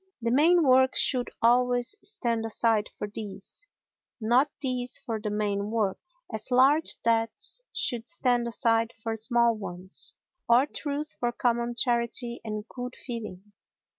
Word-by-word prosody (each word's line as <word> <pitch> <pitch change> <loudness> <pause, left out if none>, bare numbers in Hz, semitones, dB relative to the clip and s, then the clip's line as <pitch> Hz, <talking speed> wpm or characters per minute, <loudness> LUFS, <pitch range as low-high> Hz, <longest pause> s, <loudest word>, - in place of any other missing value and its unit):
The 230 -1 -1
main 330 +6 +5
work 260 0 +5
should 250 -3 +1
always 245 - +3
stand 235 - -2
aside 225 -1 +1
for - - -3
these, 210 - -9 0.5
not 245 +6 +3
these 255 -2 -2
for 225 -2 -4
the 210 - -2
main 205 -1 -1
work, 215 -4 0 0.3
as 215 +3 -4
large 270 +5 +4
debts 230 - 0
should 235 -1 -2
stand 245 -2 +1
aside 230 -1 +1
for 225 -1 -1
small 235 +1 +2
ones, 185 -2 -1 0.3
or 240 +3 +6
truth 295 0 -4
for 240 -1 0
common 240 0 0
charity 235 0 0
and 215 0 -5
good 250 +1 -7
feeling. 210 -5 -8
235 Hz, 135 wpm, -27 LUFS, 220-250 Hz, 0.5 s, or